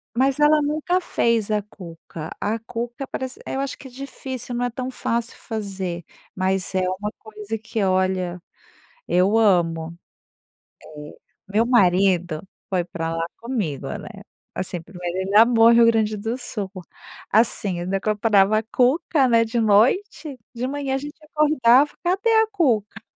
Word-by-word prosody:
Mas 265 +3 +2
ela 300 +1 +5
nunca 310 +5 0
fez 230 - 0
a 210 -1 +1
cuca, 165 -5 -10
a 215 +2 0
cuca 240 +3 -6
parece 260 0 -5
é - - -4
eu - - -2
acho 275 0 -3
que 270 - -11
é - - -14
difícil, 260 -1 -7
não 245 +1 0
é - - -1
tão 250 +2 -5
fácil 235 -2 -3
fazer, 195 -6 -5 0.3
mas 190 0 -1
é 190 - +1 0.2
uma 210 +1 -3
coisa 215 0 -6
que, 220 -1 -3
olha, 185 -2 0 0.7
eu 185 +4 +3
amo. 170 -6 +2 0.9
Eh, 150 -1 -11 0.4
meu 220 +3 +3
marido 180 -7 +3 0.3
foi 185 -3 0
para 165 -1 -4
lá 165 0 -2
comigo 220 - -3
né, - - -9 0.5
assim, 180 -1 -4
primeiro 180 +1 -6
ele 190 +2 -1
amou 230 +1 +7
Rio 235 0 +6
Grande 220 -2 +2
do 225 +4 -3
Sul, 205 -5 -5 0.6
assim, 205 -4 +2
eu - - -4
ainda 195 +2 -1
comprava 210 0 +3
a - - -1
cuca, 265 +5 +2
né, 230 -1 +4
de 230 +1 -2
noite, 260 - +2 0.2
de 240 +2 -3
manhã 280 -1 -2
a - - +1
gente 295 +2 -8
acordava: 295 -3 +4
"Cadê 380 +6 +1
a - - 0
cuca?". 225 - 0
220 Hz, 160 wpm, -22 LUFS, 190-255 Hz, 0.9 s, amou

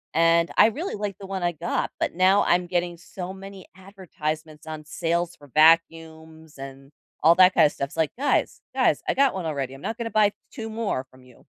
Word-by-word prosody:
and 165 +1 +3
I - - +7
really 325 - -5
like 205 -2 -4
the 195 - -9
one 190 -1 -4
I 175 - +1
got, 160 - -3
but - - -2
now 185 +3 +4
I'm 175 +1 +2
getting 175 -1 -2
so 180 +2 -8
many 195 0 -11
advertisements 160 -5 -7
on 155 -1 -7
sales 170 +3 -2
for 145 - -17
vacuums 160 -1 +1
and 135 0 -10 0.3
all 165 +2 +6
that 185 0 +6
kinda - - +5
stuff. 140 -2 -4
It's - - -14
like, 160 -2 0
"Guys, 285 +3 0
guys, - - +1
I - - +2
got 275 -3 +2
one 185 -3 -4
already, 135 -4 -3
I'm 135 - -14
not 225 - -4
gonna 230 -1 -3
buy 215 -2 +3
t - - -22
two 225 -4 -7
more 220 - -2
from 130 0 -19
you." 125 -1 -20
170 Hz, 210 wpm, -24 LUFS, 155-195 Hz, 0.3 s, I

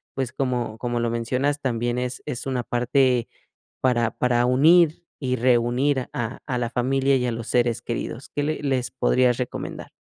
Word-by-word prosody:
pues 130 -2 -2
como, 125 -4 -2
como 120 -1 -2
lo 115 - 0
mencionas 125 +5 -1
también 120 -1 -1
es 125 0 -3
es 125 - -5
una 130 -2 -1
parte 125 0 +1 0.5
para 120 -3 +2
para 120 -1 +1
unir 160 +6 +4 0.2
y 130 -2 -1
reunir 125 +3 +2
a 120 0 -3
a 125 - -2
la 120 -1 -1
familia 135 +3 +1
y 125 - -1
a - - 0
los 115 -1 -5
seres 120 -1 +1
queridos, 120 +2 -5
¿qué 145 - 0
le 155 +1 -2
les 130 -3 0
podrías 125 -1 +2
recomendar? 125 -1 -5
125 Hz, 175 wpm, -24 LUFS, 120-135 Hz, 0.5 s, unir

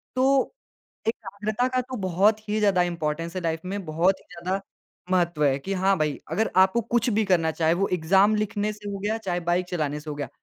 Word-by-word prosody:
तो 270 - +3 0.5
एकाग्रता 215 +2 -1
का 255 0 0
तो 255 +1 -7
बहुत 200 +5 +3
ही 215 +1 +1
ज़्यादा 195 -4 +3
इम्पोर्टेंस 165 0 -3
है 185 - -2
लाइफ़ 165 -1 -2
में 200 0 -3
बहुत 175 +5 +2
ही - - -23
ज़्यादा 185 +3 -2 0.5
महत्व 170 -4 +2
है। 135 -1 +3
कि 195 +8 -4
हाँ, 190 0 +2
भाई 150 -2 -1
अगर 220 - 0
आपको 190 +5 +5
कुछ 240 +2 0
भी 215 -1 +1
करना 165 -4 +2
चाहे 160 0 +2
वो 195 +3 +1
एग्ज़ाम 195 +6 +4
लिखने 210 0 -1
से 205 -1 -8
हो 200 - -4
गया, 215 +3 -1
चाहे 180 -5 -2
बाइक 175 +1 0
चलाने 150 -4 -2
से 150 +1 -9
हो 145 - -4
गया। 145 -4 -4
190 Hz, 215 wpm, -25 LUFS, 165-210 Hz, 0.5 s, आपको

